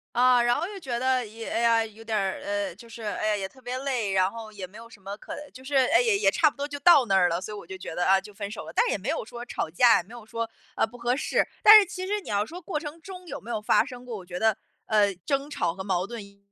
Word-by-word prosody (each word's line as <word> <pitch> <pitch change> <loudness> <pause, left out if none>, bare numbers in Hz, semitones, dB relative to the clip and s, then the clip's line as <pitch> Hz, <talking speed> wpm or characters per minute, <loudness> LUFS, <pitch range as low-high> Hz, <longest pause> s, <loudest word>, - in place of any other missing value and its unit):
啊， 250 0 +5
然 240 0 +3
后 340 - -2
又 400 0 -8
觉 255 -8 -3
得 255 0 +1
一 225 +2 -10
哎 - - -2
呀， 230 -1 +3
有 220 +1 -13
点 225 -1 -1
儿 195 -2 -1
呃， 200 -2 -2
就 230 +4 -14
是， 230 0 -10
哎 215 0 -2
呀， 215 - +2
也 195 - -3
特 260 +7 -20
别 250 +1 -4
累， 255 -7 -1
然 190 0 +3
后 225 -2 -9
也 200 -3 -7
没 195 +4 -14
有 230 0 -12
什 220 - -15
么 195 +1 -7
可 - - -9 0.2
就 260 - -12
是， 280 +2 -4
哎， 270 - +5
也 455 -4 +3
也 410 - +3
差 320 -3 +4
不 285 - -19
多 285 - -3
就 285 -1 -6
到 290 -4 +7
那 195 -3 +1
儿 180 -2 +4
了， 170 +1 -1
所 210 +3 -6
以 - - -6
我 200 - -10
就 190 +1 -7
觉 180 - -7
得， 175 - -1
啊， 190 0 +5
就 205 +2 -13
分 200 0 -5
手 210 -6 -7
了， 160 - -8
但 - - +3
也 - - 0
没 205 +8 -5
有 325 - -1
说 240 +1 -8
吵 165 - -3
架， 230 +8 +5
也 - - -2
没 220 +6 -16
有 235 -3 -10
说， 230 0 -4 0.3
呃， - - +2
不 240 +2 -13
合 245 +1 0
适。 290 - 0
但 430 +1 +11
是 415 - +2
其 370 +1 -6
实 420 +1 0
你 - - -11
要 205 0 +1
说 345 +7 -9
过 325 -3 -3
程 300 +1 -8
中 365 0 -10
有 - - -6
没 235 +3 -8
有 220 - -2
发 210 - +4
生 250 -3 -9
过， 240 -3 -6
我 185 - -10
觉 180 0 -6
得， 220 -1 +2 0.3
呃， 205 -2 +3
争 275 0 0
吵 170 - -1
和 190 - -6
矛 185 -1 -1
盾 235 -3 -7
也 200 0 -19
230 Hz, 340 characters per minute, -26 LUFS, 200-265 Hz, 0.3 s, 但